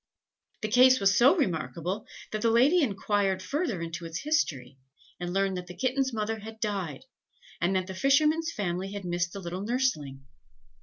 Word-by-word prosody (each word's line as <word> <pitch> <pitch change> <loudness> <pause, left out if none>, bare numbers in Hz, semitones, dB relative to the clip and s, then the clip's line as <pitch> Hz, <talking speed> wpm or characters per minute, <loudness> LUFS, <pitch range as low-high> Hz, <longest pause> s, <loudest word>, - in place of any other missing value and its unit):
"The - - +1
case 255 +3 +6
was 195 0 +3
so 260 +8 +6
remarkable 180 - -2 0.2
that 215 - -3
the 230 - +3
lady 265 +10 +4
enquired 200 -5 0
further 235 - -2
into 165 +1 -6
its 165 +5 -5
history, 140 - -1 0.4
and 175 0 -4
learned 195 0 0
that 180 0 -6
the 180 - -10
kitten's 265 +1 0
mother 220 0 -2
had 220 +1 -10
died, 195 - -3 0.6
and 180 +3 +1
that 185 -1 +1
the 190 - -7
fisherman's 305 - +2
family 195 - -3
had 200 -2 -6
missed 175 0 -1
the 200 - -6
little 180 0 -5
nurseling. 200 - -1
200 Hz, 170 wpm, -28 LUFS, 175-250 Hz, 0.6 s, case